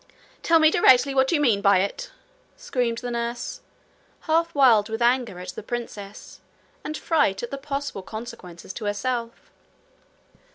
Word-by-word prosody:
'Tell 330 - +4
me 315 -1 +5
directly 270 -4 +5
what 265 0 +2
you 330 - +2
mean 230 -9 +2
by 200 -1 +5
it!' 200 - -2 0.5
screamed 240 -3 -2
the 245 +1 -5
nurse, 235 0 -4 0.6
half 330 +1 0
wild 235 -7 +5
with 225 0 -3
anger 240 -4 +1
at 180 +1 -8
the 185 - -7
princess 210 -3 -7 0.4
and 305 0 -4
fright 290 - +1
at 240 - -5
the - - -3
possible 275 -6 -4
consequences 190 -5 -9
to 215 - -7
herself. 235 +3 -3
240 Hz, 150 wpm, -24 LUFS, 205-275 Hz, 0.6 s, me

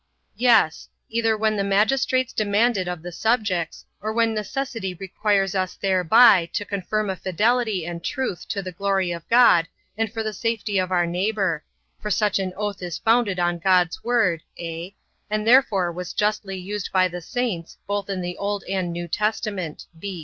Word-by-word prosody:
Yes: 230 -10 +3 0.2
either 225 -1 +1
when 215 0 +1
the 200 - 0
magistrates 235 +6 +2
demand 215 +3 +2
it 185 -2 -2
of 175 -2 -4
the 175 - -6
subjects; 195 -4 -1 0.2
or 215 +2 -2
when 230 0 +2
necessity 215 -2 -3
requires 195 +1 0
us 185 -1 -1
thereby 190 0 +5
to 205 - -2
confirm 205 +1 -2
a - - -3
fidelity 210 +1 0
and 170 0 -6
truth 255 -4 -3
to 200 -2 -3
the 185 - -5
glory 195 0 0
of 170 -1 -7
God, 230 -9 +6 0.3
and 225 0 -1
the 220 -1 -3
safety 215 -2 -1
of 185 0 -1
our 175 -1 +3
neighbour: 180 -2 -1 0.4
for 210 - -4
such 205 0 +1
an 190 -1 -2
oath 205 -1 -3
is 175 -3 -4
founded 225 -4 +2
on 175 0 0
God's 180 -1 +2
word, 225 -9 +2 0.2
(a) 170 +3 -6 0.3
and 215 0 -1
therefore 220 -8 +4
was 180 +1 -6
justly 205 -2 -1
used 195 +2 -5
by 185 -1 +4
the 180 0 -7
saints, 200 -4 -3
both 205 0 -3
in 190 -2 -2
the 175 0 -4
Old 200 0 -2
and 185 -2 -1
New 175 0 -4
Testament. 210 -4 -2
200 Hz, 170 wpm, -23 LUFS, 180-220 Hz, 0.4 s, God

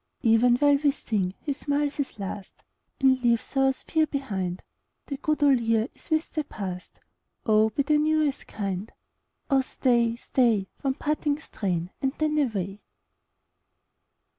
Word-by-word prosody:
37 225 -2 +5
Even 240 +2 +5
while 285 +2 +4
we 290 - +5
sing 200 -9 -2
he 290 - -2
smiles 285 +1 -1
his 285 -6 -3
last 200 0 -7 0.4
And 260 -2 +4
leaves 235 +2 +1
our 270 0 +4
sphere 315 +4 0
behind. 190 -11 -3 0.4
The 280 - -5
good 305 +1 0
old 275 -3 +5
year 225 +1 +1
is - - -16
with 315 0 0
the 310 - -1
past; 185 -8 -7 0.5
Oh 215 0 +4
be 280 +6 0
the 300 +2 +3
new 310 0 +3
as 275 - -4
kind! 200 0 -4 0.6
Oh 270 - +5
staj, 240 -3 +1
oh - - -7
stay, 235 -5 +1
One 270 -2 0
parting 295 0 0
strain, 180 - -3
and 270 -1 0
then 305 -1 +1
away. 205 -7 -2
260 Hz, 160 wpm, -26 LUFS, 215-290 Hz, 0.6 s, 37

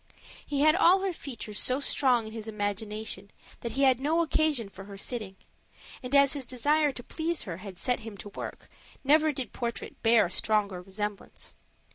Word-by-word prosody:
He 280 -1 -1
had 310 +1 +6
all 370 +1 +6
her 385 -2 0
features 235 -9 -6
so 255 +2 +1
strong 255 -5 +2
in 220 - -8
his 225 -1 -5
imagination 210 -1 -3 0.3
that 235 -1 -4
he 275 +3 +1
had 260 -2 +5
no 320 +5 +2
occasion 310 -8 +1
for 195 0 -11
her 200 -1 -9
sitting; 210 -2 -3 0.7
and 255 +2 -2
as 280 -1 +6
his 275 -4 -4
desire 290 +4 +2
to 245 - -9
please 325 +4 -1
her 165 -4 -5
had 190 -1 -9
set 250 +5 0
him 220 -3 -8
to 205 - -8
work, - - -7 0.4
never 305 +3 +5
did 260 -5 -5
portrait 235 -1 -4
bear 225 -1 +5
a 175 - -5
stronger 205 -3 +1
resemblance. 200 +2 -5
235 Hz, 185 wpm, -29 LUFS, 210-285 Hz, 0.7 s, had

